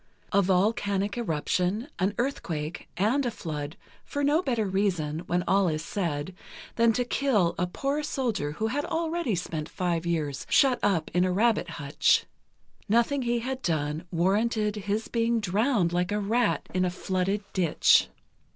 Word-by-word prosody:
A 200 Hz, -, +4 dB
volcanic 200 Hz, +1 st, +1 dB
eruption, 190 Hz, -, -1 dB
an 195 Hz, +2 st, +1 dB
earthquake 170 Hz, -, -3 dB
and 225 Hz, +10 st, +2 dB
a 245 Hz, -, 0 dB
flood, 155 Hz, -8 st, -5 dB, 0.3 s
for 285 Hz, -, -3 dB
no 295 Hz, +4 st, +3 dB
better 240 Hz, -9 st, 0 dB
reason, 185 Hz, -6 st, 0 dB
when 175 Hz, 0 st, +1 dB
all 195 Hz, -1 st, +3 dB
is 155 Hz, 0 st, -2 dB
said, 170 Hz, -3 st, -3 dB, 0.4 s
than 230 Hz, -1 st, +4 dB
to 245 Hz, +2 st, 0 dB
kill 235 Hz, -10 st, +2 dB
a 180 Hz, -, +1 dB
poor 275 Hz, +10 st, -2 dB
soldier 235 Hz, -, -2 dB
who 215 Hz, -, -2 dB
had 270 Hz, +6 st, -1 dB
already 325 Hz, -, -1 dB
spent 160 Hz, -3 st, -4 dB
five 175 Hz, -3 st, -1 dB
years 150 Hz, -5 st, -2 dB
shut 260 Hz, -4 st, +4 dB
up 180 Hz, -6 st, +1 dB
in 180 Hz, +1 st, +3 dB
a 185 Hz, -, +1 dB
rabbit 210 Hz, -1 st, +2 dB
hutch. 145 Hz, -2 st, +2 dB, 0.6 s
Nothing 235 Hz, +6 st, +2 dB
he 240 Hz, -1 st, 0 dB
had 260 Hz, +2 st, -4 dB
done 155 Hz, -, -1 dB
warranted 210 Hz, +5 st, +1 dB
his 210 Hz, +2 st, -2 dB
being 230 Hz, 0 st, +1 dB
drowned 205 Hz, -2 st, +1 dB
like 180 Hz, +1 st, 0 dB
a 210 Hz, -, 0 dB
rat 220 Hz, +3 st, +1 dB
in 185 Hz, 0 st, +1 dB
a 180 Hz, -, +2 dB
flooded 190 Hz, +2 st, -1 dB
ditch. 175 Hz, -5 st, +4 dB
200 Hz, 160 wpm, -27 LUFS, 175-235 Hz, 0.6 s, A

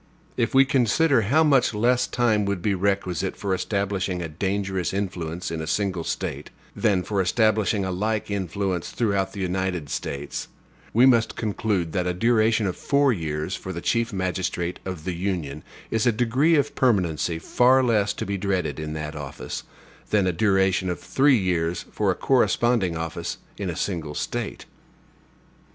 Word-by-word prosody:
If 115 Hz, -, 0 dB
we 135 Hz, 0 st, +7 dB
consider 135 Hz, +1 st, +3 dB
how 140 Hz, +10 st, +3 dB
much 135 Hz, -7 st, +3 dB
less 125 Hz, +3 st, +2 dB
time 110 Hz, -4 st, +1 dB
would 100 Hz, -3 st, -2 dB
be 105 Hz, -, +2 dB
requisite 95 Hz, -2 st, -1 dB
for 100 Hz, -2 st, -1 dB
establishing 95 Hz, -1 st, -1 dB
a 85 Hz, -, -3 dB
dangerous 95 Hz, +2 st, -2 dB
influence 90 Hz, -4 st, -3 dB
in 80 Hz, -1 st, -3 dB
a 80 Hz, -, -5 dB
single 95 Hz, 0 st, -1 dB
State, -, -, -4 dB, 0.3 s
than 100 Hz, -5 st, +2 dB
for 100 Hz, 0 st, 0 dB
establishing 110 Hz, +1 st, +2 dB
a 95 Hz, -, -2 dB
like 105 Hz, +3 st, -1 dB
influence 95 Hz, -2 st, -2 dB
throughout 100 Hz, -5 st, 0 dB
the 100 Hz, -, -7 dB
United 90 Hz, -4 st, -2 dB
States, 70 Hz, +1 st, -4 dB, 0.4 s
we 120 Hz, +3 st, +5 dB
must 120 Hz, -4 st, +4 dB
conclude 105 Hz, -5 st, -1 dB
that 90 Hz, -1 st, 0 dB
a 90 Hz, -, -1 dB
duration 110 Hz, +1 st, +3 dB
of 90 Hz, -, -1 dB
four 140 Hz, -2 st, +2 dB
years 80 Hz, -1 st, -3 dB
for 95 Hz, -, -6 dB
the 85 Hz, -, -4 dB
Chief 115 Hz, +5 st, 0 dB
Magistrate 90 Hz, -2 st, -2 dB
of 90 Hz, -5 st, -5 dB
the 90 Hz, -, -2 dB
Union 85 Hz, -5 st, -3 dB, 0.3 s
is 115 Hz, +1 st, +1 dB
a -, -, +6 dB
degree 125 Hz, +8 st, +2 dB
of 145 Hz, -3 st, +1 dB
permanency 90 Hz, -, +1 dB
far 130 Hz, +9 st, +3 dB
less 110 Hz, -4 st, +2 dB
to -, -, -4 dB
be 100 Hz, 0 st, -3 dB
dreaded 95 Hz, -4 st, -1 dB
in 75 Hz, 0 st, -4 dB
that 75 Hz, 0 st, -5 dB
office, 75 Hz, -3 st, -6 dB, 0.5 s
than 105 Hz, -3 st, +3 dB
a 90 Hz, -, +1 dB
duration 95 Hz, 0 st, +2 dB
of 90 Hz, -, -3 dB
three 135 Hz, -1 st, +3 dB
years 90 Hz, -2 st, -1 dB
for 105 Hz, -2 st, 0 dB
a 95 Hz, -, +2 dB
corresponding 120 Hz, -8 st, +2 dB
office 80 Hz, +1 st, -4 dB, 0.2 s
in 100 Hz, -3 st, -3 dB
a 85 Hz, -, -3 dB
single 80 Hz, -5 st, -3 dB
State. -, -, -4 dB
95 Hz, 170 wpm, -24 LUFS, 90-110 Hz, 0.5 s, we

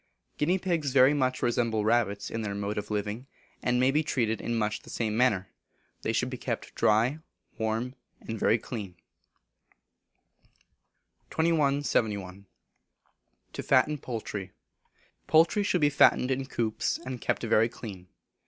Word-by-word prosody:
Guinea 170 Hz, +6 st, +2 dB
Pigs 170 Hz, -7 st, -1 dB
very 135 Hz, +1 st, +6 dB
much 130 Hz, -3 st, 0 dB
resemble 115 Hz, -3 st, +1 dB
rabbits 110 Hz, -3 st, +1 dB
in 115 Hz, -, -3 dB
their 100 Hz, -2 st, -3 dB
mode 100 Hz, +1 st, -2 dB
of 105 Hz, -, -7 dB
living, 105 Hz, +4 st, -3 dB, 0.3 s
and 125 Hz, 0 st, +1 dB
may 130 Hz, +1 st, +4 dB
be 150 Hz, +3 st, +2 dB
treated 120 Hz, -7 st, -1 dB
in 120 Hz, -, -2 dB
much 105 Hz, -1 st, -1 dB
the -, -, -15 dB
same 110 Hz, -2 st, -2 dB
manner. 105 Hz, -6 st, +2 dB, 0.5 s
They -, -, -1 dB
should -, -, 0 dB
be -, -, -6 dB
kept -, -, -4 dB
dry, 115 Hz, +8 st, +2 dB, 0.4 s
warm, 110 Hz, +3 st, -1 dB, 0.3 s
and 115 Hz, -1 st, -6 dB
very 115 Hz, -, +3 dB
clean. 105 Hz, -5 st, -7 dB, 2.3 s
2171. 140 Hz, -, 0 dB, 1.1 s
To -, -, -4 dB
Fatten 145 Hz, +3 st, +3 dB
Poultry. 105 Hz, -6 st, -5 dB, 0.8 s
Poultry 165 Hz, +6 st, +4 dB
should 190 Hz, -4 st, +1 dB
be 145 Hz, 0 st, +4 dB
fattened 135 Hz, -2 st, +4 dB
in 135 Hz, 0 st, -1 dB
coops, 110 Hz, -5 st, -1 dB
and 130 Hz, -2 st, -7 dB
kept -, -, -1 dB
very 115 Hz, 0 st, +3 dB
clean. 95 Hz, -6 st, -9 dB
120 Hz, 140 wpm, -28 LUFS, 105-140 Hz, 2.3 s, very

